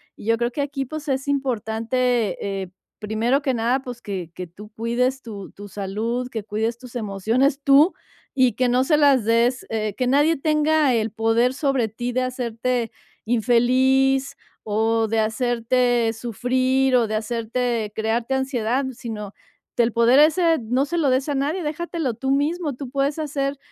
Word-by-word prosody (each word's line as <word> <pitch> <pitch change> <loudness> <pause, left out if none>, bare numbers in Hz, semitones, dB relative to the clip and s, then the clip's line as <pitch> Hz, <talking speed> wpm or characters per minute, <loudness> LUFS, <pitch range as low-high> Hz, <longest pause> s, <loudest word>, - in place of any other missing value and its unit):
Y - - -13
yo 230 +1 +2
creo 235 +1 -1
que 285 - -3
aquí, 280 -1 -3
pues, 305 +2 -6
es 270 +1 -1
importante, 235 -5 -1
eh, 185 - -9 0.3
primero 225 +6 0
que 270 -3 0
nada, 245 +3 +1
pues, 245 -3 -8
que 185 -6 -5
que 180 +1 -7
tú 205 +5 -13
cuides 240 +4 -1
tu 205 -5 -9
tu 205 +1 -11
salud, 215 +6 -3
que 220 -4 -5
cuides 220 +2 -2
tus 250 0 -13
emociones 230 +6 0
tú, 285 +5 +5 0.5
y 255 -3 +4
que 250 +3 +1
no 250 +1 +3
se 300 +3 +3
las 280 -6 +4
des, 235 +3 +2
eh, 215 -2 -2
que 255 - 0
nadie 290 +5 +3
tenga 305 -2 +2
el 225 -1 0
poder 225 +3 +2
sobre 275 -5 +1
ti 240 +3 -4
de 255 +1 0
hacerte 245 -2 -2 0.3
infeliz 255 +4 +2 0.3
o 225 +1 +1
de 225 +1 -1
hacerte 240 +1 +1
sufrir 255 +3 +1
o 240 -2 +3
de 215 - -2
hacerte 230 0 -2
crearte 230 +4 -1
ansiedad, 265 -1 -1
sino 220 -4 -7 0.4
que 240 - +3
el 230 - +1
poder 235 +4 +4
ese 325 +2 +4
no 250 +5 0
se 345 +4 -3
lo 295 -4 +2
des 260 +2 +1
a 290 - 0
nadie, 300 +7 -1
déjatelo 315 -3 -3
tú 265 +4 -4
mismo, 295 +2 0
tú 255 -1 -8
puedes 280 +2 0
hacer 285 -2 -2
245 Hz, 170 wpm, -22 LUFS, 225-270 Hz, 0.5 s, tú